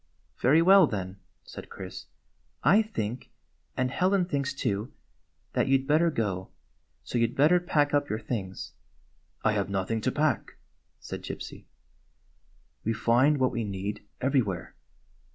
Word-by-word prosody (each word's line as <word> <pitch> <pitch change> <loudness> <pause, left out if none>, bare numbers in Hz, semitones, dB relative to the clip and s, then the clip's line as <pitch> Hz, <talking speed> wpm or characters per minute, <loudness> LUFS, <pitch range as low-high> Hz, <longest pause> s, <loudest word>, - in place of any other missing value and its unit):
"Very 155 +6 +5
well, 190 -1 +7
then," 95 -4 -4 0.3
said - - -10
Chris. - - -8 0.6
"I 205 +4 +6
think 125 - -4 0.2
— 65 - -41
and 130 0 0
Helen 185 +3 +2
thinks, 140 -5 -1
too 105 -4 -2 0.3
— - - -44
that - - +1
you 135 0 +5
'd 135 - -7
better 155 +4 +3
go. 100 - -2 0.5
So 120 - -2
you 115 - +4
'd - - -11
better 155 +6 +5
pack 150 -4 +1
up 145 0 +2
your 105 - -1
things 105 -4 -5 0.2
— - - -37
" - - -40
" - - -38
I 110 - +5
have 100 -2 -1
nothing 100 +3 -1
to 130 - 0
pack," 150 -4 0 0.4
said - - -7
Gypsy. - - -7 1.2
"We 115 - 0
find 120 +6 +3
what 130 -1 +2
we 115 - -2
need, 100 0 -4 0.2
everywhere. 125 -9 0
125 Hz, 165 wpm, -28 LUFS, 105-145 Hz, 1.2 s, well